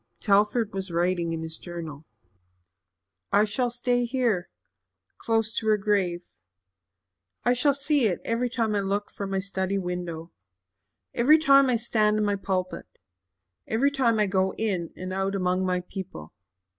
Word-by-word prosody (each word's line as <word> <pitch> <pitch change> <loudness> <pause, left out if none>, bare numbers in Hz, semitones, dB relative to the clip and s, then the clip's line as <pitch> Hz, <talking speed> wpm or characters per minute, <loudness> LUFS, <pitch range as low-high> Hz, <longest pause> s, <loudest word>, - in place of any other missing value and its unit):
Telford 210 +2 +2
was 195 0 -3
writing 170 0 0
in 165 0 -3
his 160 0 -5
journal. 160 -4 -8 1.2
"I 205 +1 +5
shall 230 +4 0
stay 245 0 0
here 235 -7 0 0.7
close 225 -1 0
to 220 - -1
her 215 -1 +4
grave. 195 -4 0 1.2
I 245 - +3
shall 265 +3 +2
see 280 -3 +2
it 180 - -1
every 240 +2 0
time 230 -3 -1
I 205 - +1
look 200 +1 -2
from 200 -1 -5
my 195 - -1
study 195 0 -2
window 175 -3 -4 0.8
every 285 +7 +5
time 275 -3 +5
I 250 - +3
stand 215 -2 +2
in 215 - +1
my 205 0 +1
pulpit 185 -2 -3 0.8
every 260 +6 +2
time 250 -5 +2
I 210 - +4
go 190 -1 0
in 190 -7 -2
and 185 +1 -5
out 195 +1 -1
among 185 0 0
my 180 0 0
people. 180 - -8
200 Hz, 155 wpm, -26 LUFS, 185-230 Hz, 1.2 s, I